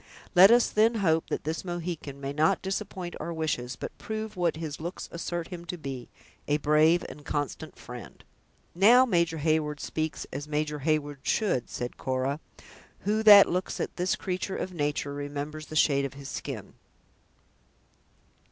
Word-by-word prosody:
Let 190 +1 +9
us 240 +1 +6
then 225 +2 +4
hope 165 -6 +1
that - - -2
this 160 +2 -3
Mohican 170 -5 -5
may 140 0 -4
not 155 +2 +2
disappoint 190 -2 -4
our 170 - -4
wishes, 155 -6 -2
but - - -7
prove 220 0 -5
what 175 -3 +1
his 155 -2 -5
looks 170 +3 -5
assert 170 0 -4
him 175 -2 -7
to 180 - -5
be, 135 -5 -6 0.4
a 145 - +2
brave 155 +4 +4
and 150 - -11
constant 145 -3 -4
friend." - - -10 0.5
"Now 230 +8 +7
Major 170 -7 +1
Heyward 155 -1 0
speaks 155 -1 -3
as 145 +2 -5
Major 150 0 -1
Heyward 145 -1 0
should," 155 - 0
said 120 0 -5
Cora; 130 +2 -1 0.6
"who 215 +2 +1
that 205 -2 +10
looks 180 +2 -2
at - - -3
this 180 +1 +1
creature 185 +1 -3
of 185 - -4
nature, 145 -3 -1
remembers 145 +2 -5
the 155 - -8
shade 140 -2 +4
of 135 - -6
his 140 -1 -8
skin?" - - -6
160 Hz, 160 wpm, -28 LUFS, 145-180 Hz, 0.6 s, that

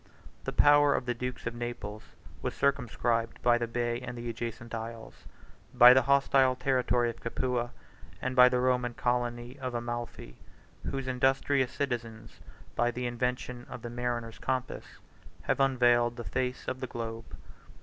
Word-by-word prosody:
The - - -2
power 145 0 +5
of - - -2
the 120 - 0
dukes 125 +1 -5
of 115 - -2
Naples 120 -3 -5 0.4
was 125 - -3
circumscribed 120 -4 0
by 120 -1 +4
the 120 - -1
bay 120 0 -1
and 125 -1 -6
the 120 0 -5
adjacent 115 0 -6
isles, 115 0 -7 0.5
by 125 0 +10
the 130 - +5
hostile 135 -1 +3
territory 125 -2 +1
of 115 - -15
Capua, 120 0 -1 0.5
and 130 0 -3
by 125 0 +8
the 125 0 +1
Roman 125 -1 +1
colony 120 +1 -2
of 130 -2 -4
Amalphi, 120 - -5 0.4
35 - - -4
whose 135 -1 -4
industrious 130 +1 +2
citizens, 115 -5 -4 0.4
by 120 - +2
the 125 +1 -4
invention 125 0 -3
of 120 - -8
the 120 - -5
mariner's 120 -1 -3
compass, 130 -1 -2 0.6
have - - 0
unveiled 120 -3 +3
the 120 - -6
face 125 +1 -3
of 130 - -3
the 130 - -4
globe. 115 -1 -6
120 Hz, 160 wpm, -30 LUFS, 120-130 Hz, 0.6 s, by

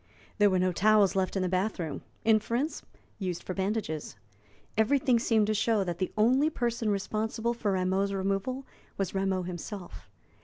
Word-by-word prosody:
There 205 0 +6
were 185 - +2
no 185 0 +2
towels 205 +1 +4
left 190 0 0
in 190 - +1
the - - +1
bath 185 +4 0
room; 155 -5 -4 0.2
inference, 230 +7 +1 0.4
used 180 -4 -3
for 185 - -4
bandages. 190 -5 -2 0.6
Everything 255 +2 +3
seemed 225 -2 +3
to 215 - +1
show 215 -1 +2
that 175 -2 -4
the 185 - -1
only 255 +8 +4
person 235 -5 -1
responsible 220 +3 -1
for 220 -4 -1
Rameau's 190 +2 +1
removal 195 +7 -2 0.3
was 195 -3 -2
Rameau 190 -1 0
himself. 175 - -7
200 Hz, 160 wpm, -29 LUFS, 185-225 Hz, 0.6 s, There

